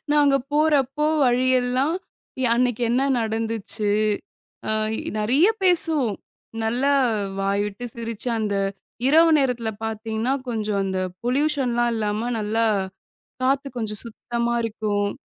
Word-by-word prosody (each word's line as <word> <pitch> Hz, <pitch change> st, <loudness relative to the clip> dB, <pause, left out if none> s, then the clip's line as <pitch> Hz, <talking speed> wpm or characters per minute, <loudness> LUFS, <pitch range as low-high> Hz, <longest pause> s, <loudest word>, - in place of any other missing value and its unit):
நாங்க 290 Hz, -2 st, +4 dB, 0.2 s
போறப்போ 295 Hz, -2 st, +2 dB, 0.2 s
வழி 250 Hz, +1 st, +2 dB
எல்லாம், 255 Hz, +6 st, 0 dB, 0.5 s
யா -, -, +3 dB
அன்னைக்கு 245 Hz, -1 st, +1 dB
என்ன 250 Hz, +3 st, +2 dB, 0.2 s
நடந்துச்சு? 220 Hz, -1 st, -2 dB, 0.8 s
அ -, -, +1 dB, 0.3 s
இ -, -, -4 dB, 0.2 s
நிறையா 265 Hz, -, +4 dB
பேசுவோம். 315 Hz, -, +3 dB, 0.5 s
நல்லா 245 Hz, +6 st, +1 dB, 0.5 s
வாய்விட்டு 200 Hz, +3 st, -1 dB
சிரிச்சு, 230 Hz, 0 st, -5 dB
அந்த 210 Hz, -2 st, -1 dB, 0.5 s
இரவு 325 Hz, +3 st, +6 dB
நேரத்துல 245 Hz, -4 st, 0 dB
பாத்தீங்கன்னா, 220 Hz, +3 st, -2 dB
கொஞ்சம் 215 Hz, -3 st, -1 dB
அந்த 190 Hz, -1 st, -2 dB, 0.3 s
பொலியூஷன்லாம் 250 Hz, -3 st, +1 dB
இல்லாம 215 Hz, +2 st, -1 dB
நல்லா 220 Hz, +2 st, 0 dB, 0.8 s
காத்து 275 Hz, +2 st, +1 dB
கொஞ்சம் 215 Hz, -2 st, -1 dB
சுத்தமா 235 Hz, +1 st, -3 dB
இருக்கும். 210 Hz, -2 st, -1 dB
235 Hz, 110 wpm, -23 LUFS, 215-270 Hz, 0.8 s, இரவு